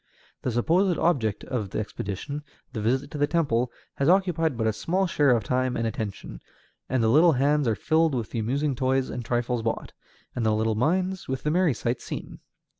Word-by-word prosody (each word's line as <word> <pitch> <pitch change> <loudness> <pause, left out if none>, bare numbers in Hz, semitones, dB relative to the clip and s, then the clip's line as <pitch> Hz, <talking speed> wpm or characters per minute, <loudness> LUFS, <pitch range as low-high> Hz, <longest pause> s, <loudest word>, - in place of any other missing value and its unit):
The - - -1
supposed 170 - +2
object 115 - +1
of 110 -6 -3
the - - -3
expedition, 105 +7 -5 0.3
the 110 - -3
visit 130 +6 0
to 150 - -5
the 145 - +3
temple, 125 -8 +1 0.3
has 140 +3 +2
occupied 170 -7 +2
but 110 - 0
a 110 - +2
small 185 - 0
share 150 -5 +2
of 120 -4 +3
time 125 +3 0
and 115 - -1
attention, 100 - -5 0.5
and 130 -2 +1
the - - +3
little 155 +8 +6
hands 145 +1 +2
are 110 - +2
filled 160 - +2
with 115 -3 -3
the 115 - -2
amusing 135 +6 0
toys 130 +1 0
and 120 - -4
trifles 120 0 -1
bought, 115 0 -3 0.4
and 120 - -1
the 110 -1 +2
little 110 +1 +1
minds 180 - 0
with 130 0 -3
the 150 - +1
merry 170 -5 +2
sights 120 +2 -2
seen. - - -7
130 Hz, 200 wpm, -26 LUFS, 115-155 Hz, 0.5 s, little